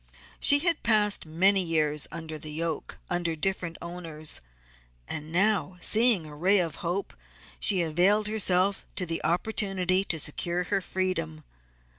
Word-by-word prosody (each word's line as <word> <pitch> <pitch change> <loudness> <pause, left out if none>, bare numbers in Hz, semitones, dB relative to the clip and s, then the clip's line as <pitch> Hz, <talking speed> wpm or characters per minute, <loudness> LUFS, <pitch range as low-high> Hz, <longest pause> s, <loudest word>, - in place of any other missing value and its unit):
She 285 - +7
had 335 +2 +1
passed 210 -6 +2
many 190 +5 +2
years 155 -4 0
under 160 -2 -7
the 155 0 -8
yoke, 160 0 -4
under 175 -2 -1
different 175 0 -3
owners, 165 -3 -7 0.7
and 155 0 -6
now 190 0 +1
seeing 220 -4 +3
a 150 -1 -11
ray 185 +7 +2
of 165 -6 -1
hope 180 +3 -4 0.5
she 190 -4 +5
availed 185 +7 +2
herself 195 -2 +1 0.2
of 180 - -1
the 165 0 -4
opportunity 190 0 0
to 165 -4 -1
secure 170 +4 0
her 195 +2 -1
freedom. 180 - -3
180 Hz, 140 wpm, -27 LUFS, 160-195 Hz, 0.7 s, She